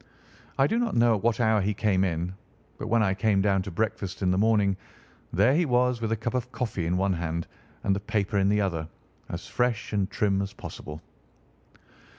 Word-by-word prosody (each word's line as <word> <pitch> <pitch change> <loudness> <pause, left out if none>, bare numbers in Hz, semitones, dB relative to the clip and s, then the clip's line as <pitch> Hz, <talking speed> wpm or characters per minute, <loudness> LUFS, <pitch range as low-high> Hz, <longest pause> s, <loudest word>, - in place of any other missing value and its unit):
I 135 - +5
do 225 +10 +1
not 235 -3 0
know 120 0 +5
at 105 - -1
what 115 +2 +1
hour 110 -3 +3
he 100 +2 0
came 100 -2 +2
in, 90 0 -1 0.5
but - - -4
when 115 0 +3
I 95 -2 +2
came 100 +1 +2
down 95 -1 +2
to 95 - -5
breakfast 95 0 -2
in 90 - +3
the 90 - +1
morning 105 -3 +3 0.6
there 105 +9 +4
he 170 +4 +3
was 125 -1 +2
with 110 -1 -1
a - - +3
cup 120 +3 -3
of 125 -1 -2
coffee 115 -8 -2
in 90 +2 +1
one 95 +1 +2
hand 85 -1 -2 0.4
and 100 -1 +2
the - - -2
paper 100 -1 -1
in 95 0 +3
the 105 0 +3
other, 85 -5 -1 0.4
as - - -5
fresh 120 -3 -1
and 100 -1 +1
trim 100 -1 +1
as 100 0 -4
possible. 75 +1 -8
105 Hz, 210 wpm, -27 LUFS, 95-115 Hz, 0.6 s, I